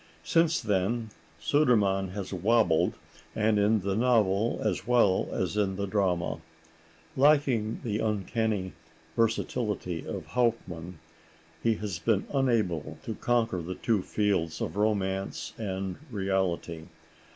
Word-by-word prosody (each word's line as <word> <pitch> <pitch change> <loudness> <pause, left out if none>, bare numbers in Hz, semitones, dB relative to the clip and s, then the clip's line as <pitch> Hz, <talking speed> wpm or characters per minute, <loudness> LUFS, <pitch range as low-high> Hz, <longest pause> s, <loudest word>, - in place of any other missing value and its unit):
Since 165 - +2
then 110 +2 0 0.3
Sudermann 105 -10 +3
has 95 +1 -5
wobbled, 95 -3 +2 0.4
and 105 -1 +2
in 105 +1 +3
the 95 +1 -1
novel 110 -2 +2
as - - -1
well 120 -6 +3
as - - -2
in 100 -2 +1
the 100 +1 -2
drama. 95 -4 0 0.8
Lacking 135 -6 +3
the 110 -2 -1
uncanny 105 -2 -1 0.4
versatility 110 -6 -1
of - - -5
Hauptmann, 95 -8 -1 0.6
he 115 -1 +2
has 100 -5 -4
been 100 +2 +1
unable 115 - 0
to - - -4
conquer 115 -6 0
the 90 +3 -5
two 105 +2 +1
fields 95 -5 0
of - - -3
romance 100 -2 -1
and 95 -3 -3
reality. 95 -6 -1
105 Hz, 120 wpm, -28 LUFS, 95-115 Hz, 0.8 s, Sudermann